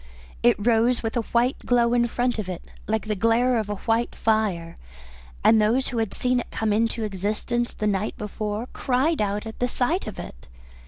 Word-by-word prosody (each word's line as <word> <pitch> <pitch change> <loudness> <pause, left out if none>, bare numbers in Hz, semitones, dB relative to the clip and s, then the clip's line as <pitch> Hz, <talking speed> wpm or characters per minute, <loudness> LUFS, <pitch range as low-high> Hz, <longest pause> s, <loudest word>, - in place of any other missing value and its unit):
It - - +5
rose 230 +3 +2
with 225 +1 -2
a 240 - +2
white 240 +3 +2
glow 240 -1 +2
in 240 -1 +3
front 245 0 -1
of 195 -3 -4
it, 180 - -5 0.2
like 220 0 0
the 215 - -1
glare 230 +4 +2
of 215 -2 -3
a 205 - -1
white 230 +1 +1
fire, 200 -7 0 0.7
and 220 -1 +6
those 235 +5 +2
who 240 - -2
had 220 -3 -2
seen 250 0 +1
it - - -6
come 220 -2 -1
into 225 +1 0
existence 210 +4 -1
the 210 - -4
night 205 0 -1
before 210 +2 -4
cried 270 +4 +1
out 205 +1 -1
at 220 - -8
the 245 - +1
sight 265 +10 0
of 215 - -6
it. - - -9
225 Hz, 200 wpm, -24 LUFS, 210-240 Hz, 0.7 s, and